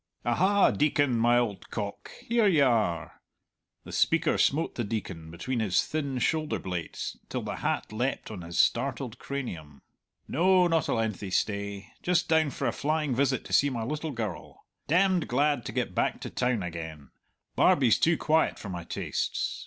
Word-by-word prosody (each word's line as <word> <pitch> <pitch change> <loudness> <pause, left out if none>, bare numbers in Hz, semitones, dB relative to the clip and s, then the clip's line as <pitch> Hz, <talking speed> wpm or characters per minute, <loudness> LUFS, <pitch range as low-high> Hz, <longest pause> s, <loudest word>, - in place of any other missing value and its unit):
"Aha, 190 +12 +4
Deacon, 145 -3 +2
my 120 +1 +4
old 115 -5 -1
cock, 100 -2 -5 0.2
here 235 -2 +3
you 155 -7 +5
are!" 110 -9 0 0.6
The - - -10
speaker 165 -1 +2
smote 160 +4 +2
the 120 - -2
Deacon 95 -7 -5
between 115 +10 -3
his 100 -5 +2
thin 140 -4 -2
shoulder 155 +4 0
blades 90 -3 -5
till - - -3
the - - -4
hat - - -2
leapt 120 +1 -2
on 100 -4 -6
his 85 0 -6
startled 125 -1 +1
cranium. 85 - -6 0.4
"No, 180 +4 +4
not 165 -3 +1
a - - +1
lengthy 110 -3 -2
stay 100 +1 -2
just 175 -2 +1
down 160 -2 +3
for - - -4
a - - +2
flying 150 -2 0
visit 130 0 +1
to - - -7
see 145 - +5
my 120 -4 -3
little 150 +6 -3
girl. 110 - -6 0.2
Dem'd 180 +2 +3
glad 140 -1 +1
to - - -4
get - - -2
back - - 0
to - - -6
town 125 -5 0
again 80 -4 -7 0.4
Barbie's 125 -6 +4
too 165 0 +3
quiet 160 +1 +2
for 100 - -8
my 90 -2 -5
tastes. - - -3
125 Hz, 170 wpm, -28 LUFS, 100-155 Hz, 0.6 s, you